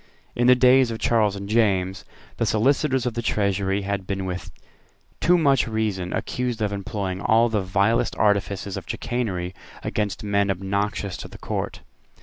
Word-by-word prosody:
In 120 0 +2
the 125 - +8
days 125 0 +5
of 115 - -3
Charles 110 -3 +2
and 100 0 -6
James, 95 -4 +1 0.3
the - - +1
Solicitors 130 +3 +2
of 125 - -1
the 120 - -2
Treasury 100 -2 0
had 100 -1 -3
been 95 -1 -2
with 90 0 -5 0.7
too 180 +1 +4
much 140 -7 +3
reason 105 -5 -2
accused 125 -2 -2
of 105 -2 -1
employing 100 -1 -3
all 115 +3 +4
the 110 -2 0
vilest 100 +4 +1
artifices 100 -2 0
of - - -8
chicanery 95 -7 -2 0.3
against 105 -2 -2
men 100 -1 +1
obnoxious 100 +1 -2
to - - -7
the - - -12
Court. - - -4
105 Hz, 160 wpm, -24 LUFS, 95-115 Hz, 0.7 s, the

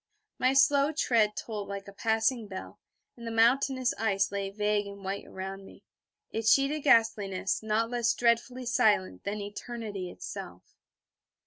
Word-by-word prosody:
My 255 +1 +3
slow 280 +1 +4
tread 225 -8 +2
tolled 210 -3 -5
like 200 0 -6
a 200 - -10
passing 225 +2 0
bell, 190 -2 -8 0.4
and 235 -1 -9
the - - -2
mountainous 250 +3 +2
ice 195 -3 +1
lay 200 -1 -2
vague 210 0 0
and 200 0 -10
white 195 +1 -4
around 195 +1 -7
me, - - -15 0.5
its 220 0 +2
sheeted 280 +2 +3
ghastliness 205 -7 +2
not 220 +2 0
less 240 -1 +1
dreadfully 245 +2 +1
silent 210 - +1
than 205 +1 -3
eternity 205 -2 -6
itself. - - -9
220 Hz, 145 wpm, -29 LUFS, 200-240 Hz, 0.5 s, slow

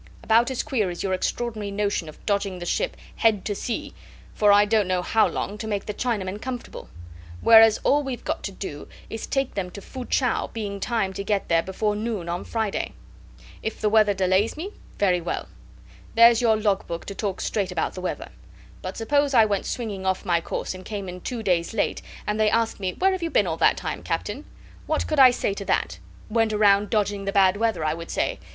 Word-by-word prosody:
"About 230 +2 +4
as 260 - -2
queer 240 -10 0
as 175 - -5
your 190 -1 0
extraordinary 215 +2 -2
notion 200 -5 -1
of 155 - -15
dodging 200 -2 0
the 175 - -6
ship - - -1 0.2
head 220 -4 +2
to 205 - -1
sea, 230 +3 -4 0.4
for 210 -1 +4
I 205 +1 +6
don't 210 -2 +2
know 180 -1 0
how 220 +4 +3
long, 210 +1 -4
to 220 - -5
make 205 -2 -2
the 210 - -4
Chinamen 205 -4 -2
comfortable; 250 -2 -6 0.5
whereas 225 -1 +7
all 290 +1 +4
we've 265 -4 -5
got - - -2
to 195 - -3
do 170 -6 -7 0.2
is 225 - -4
to - - -20
take 270 -1 0
them 190 -3 -3
to 200 - -9
Fu 255 +5 -8
chau, 250 -3 +1
being 205 -3 -4
timed 195 -3 -1
to 200 - -3
get 200 0 -1
there 165 -1 +4
before 205 +4 -1
noon 210 -5 -3
on 175 +1 -3
Friday. 220 -3 -2 0.7
If 220 - -4
the 215 - +1
weather 210 -2 +4
delays 190 +6 +1
me 370 +6 -5 0.3
very 180 -3 +2
well. 170 - -3 0.7
There's 230 0 +7
your 225 -2 +4
log 205 -2 0
book 170 0 -5
to 200 - -6
talk 195 -2 -3
straight 195 -4 -1
about 170 -3 -1
the 185 - -7
weather. 185 - -4 0.5
But - - -6
suppose 285 +4 +1
I 225 -2 +7
went 200 -2 -1
swinging 205 -6 -4
off 190 +1 0
my 175 -2 +2
course - - -4
and 185 0 -10
came 200 -3 -5
in 180 0 -8
two 235 +2 -4
days 180 +1 0
late, 210 - 0 0.2
and 210 +1 -1
they 215 -1 +4
asked 225 0 0
me: 185 -2 -2
'Where 385 +1 +2
have 375 -1 -2
you 335 - -1
been 205 - +3
all 165 -2 -2
that - - +4
time, - - -4
Captain?' - - -3 0.4
What 310 - 0
could 305 - -1
I 260 -1 +10
say 240 -4 -1
to 200 0 -6
that? - - 0 0.3
'Went 225 -1 +1
around 205 -1 +4
to - - -13
dodge 210 -2 +1
the 195 -1 -4
bad 195 -1 +4
weather,' 220 -7 0
I 155 - +1
would 165 +1 -8
say. - - -1
210 Hz, 225 wpm, -24 LUFS, 190-225 Hz, 0.7 s, I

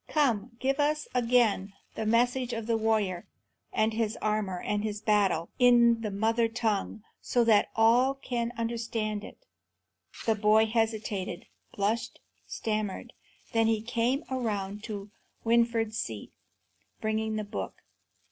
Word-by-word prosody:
Come, 235 -6 0
give 270 +3 0
us 300 +1 +1
again 230 -5 +2 0.2
the 220 - -3
message 245 +2 +2
of 225 -1 -4
the 230 0 +1
warrior 215 -5 0 0.4
and 220 +1 +1
his 220 -1 -1
armour 210 -4 -1
and 205 +2 -2
his 210 -1 -3
battle, 200 -6 +1
in 240 -2 +5
the 215 - -2
mother 225 +3 +1
tongue, 220 -2 -2 0.2
so 245 - +2
that 220 -3 +4
all 245 +4 +4
can 240 -3 -3
understand 225 -2 -2
it." - - -12 0.8
The 225 - +3
boy 215 +1 +4
hesitated, 220 -5 -2 0.3
blushed, 210 +3 -1 0.3
stammered; 215 -3 -3 0.4
then 225 -1 +3
he 225 -1 +2
came 245 +4 0
around 210 -5 -2
to 205 -2 -6 0.3
Winfried's 230 -1 +2
seat, 110 -2 -5 0.7
bringing 220 0 -1
the 215 - -2
book. 205 - -6
225 Hz, 130 wpm, -29 LUFS, 210-235 Hz, 0.8 s, in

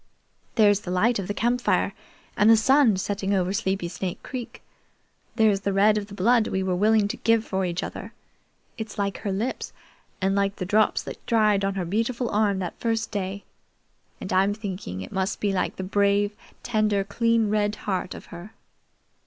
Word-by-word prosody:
There's 205 -3 +5
the 190 - -8
light 210 +6 +2
of 190 - -4
the 205 - -2
campfire, 240 +3 +1 0.4
and 210 - +4
the 225 - +8
sun 255 -2 +4
setting 200 +1 -1
over 185 0 0
Sleepy 190 -3 -1
Snake 180 +1 -5
Creek. 250 -2 -7 0.7
There's 215 -3 +3
the 200 0 -2
red 205 +2 +4
of 210 -1 -2
the 200 - -10
blood 225 +3 +3
we 190 0 -1
were 185 -1 0
willing 210 +2 +3
to - - -4
give 225 -1 +2
for 190 -1 -1
each 175 0 -2
other. - - -7 0.7
It's 220 -2 -6
like 200 -1 -2
her 200 - -3
lips, 215 +7 -3 0.5
and 195 0 +1
like 200 0 +1
the 185 - -4
drops 210 +3 +2
that - - -9
dried 215 -3 +3
on 195 0 0
her 185 -2 -2
beautiful 230 +6 -1
arm 205 -2 +2
that 180 -3 -5
first 225 -2 -1
day, 200 -1 -4 0.8
and - - -5
I'm 195 +2 +3
thinking 190 - -6
it 95 - -8
must 190 +1 -2
be 205 -2 0
like 185 - -1
the 190 - -5
brave, 200 +1 +1 0.3
tender, 215 -4 +1
clean, 230 +1 +1
red 210 0 +1
heart 185 -2 -2
of - - -10
her." 175 +5 -10
205 Hz, 185 wpm, -25 LUFS, 190-220 Hz, 0.8 s, the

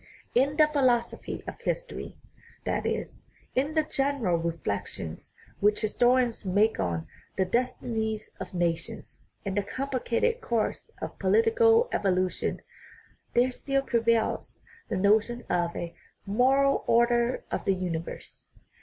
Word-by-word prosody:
In 280 +4 +2
the 305 -1 +7
philosophy 255 -6 0
of - - -8
history - - -4 0.5
that - - -1
is, - - -4 0.3
in 285 +5 0
the 315 - +4
general 275 - 0
reflections 100 - -4 0.3
which 210 +1 +3
historians 245 +2 +2
make 205 +3 +2
on 85 -3 -1 0.3
the 190 - +3
destinies 220 -1 -2
of 190 -1 -6
nations 170 -2 -2 0.3
and 195 -1 -2
the 205 - +2
complicated 270 - -1
course 235 - -1
of - - -6
political 455 +1 +4
evolu 185 -2 +2
tion - - -3 0.7
there 245 +2 +4
still 275 +2 -1
prevails 230 -3 +1 0.3
the - - -1
notion 215 +5 +2
of 170 -1 0
a 170 -1 -4 0.2
" - - -45
moral 265 +7 +3
order 235 +1 +3
of - - -2
the 195 - +3
universe." 170 -3 -5
235 Hz, 130 wpm, -28 LUFS, 190-270 Hz, 0.7 s, the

